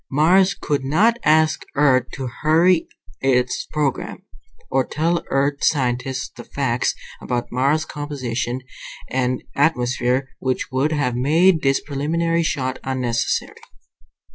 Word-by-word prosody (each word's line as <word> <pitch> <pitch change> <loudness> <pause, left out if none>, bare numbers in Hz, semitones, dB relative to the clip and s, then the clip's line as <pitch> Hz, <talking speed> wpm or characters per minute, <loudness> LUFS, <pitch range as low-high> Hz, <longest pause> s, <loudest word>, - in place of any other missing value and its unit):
Mars 185 +7 +4
could 145 -7 -2
not 210 - +2
ask 155 0 +3
Earth 130 -3 +3
to 135 - -5 0.2
hurry 165 +3 +3 0.3
its 125 -2 +1
program. 150 -4 -2 0.5
Or 135 0 +3
tell 165 +5 -1
Earth 140 +1 0
scientists 130 -2 0
the - - -9
facts - - -1 0.3
about 120 -1 -3
Mars' 140 +5 +1
composition 130 -4 -4 0.5
and 130 -1 -1
atmosphere 125 -2 +1
which 130 0 -2
would 135 +4 +1
have 140 -6 0
made 160 +7 +3
this 135 0 +2
preliminary 165 +4 -1
shot 130 -5 -2
unnecessary. 125 -3 -2
140 Hz, 115 wpm, -21 LUFS, 130-155 Hz, 0.5 s, Mars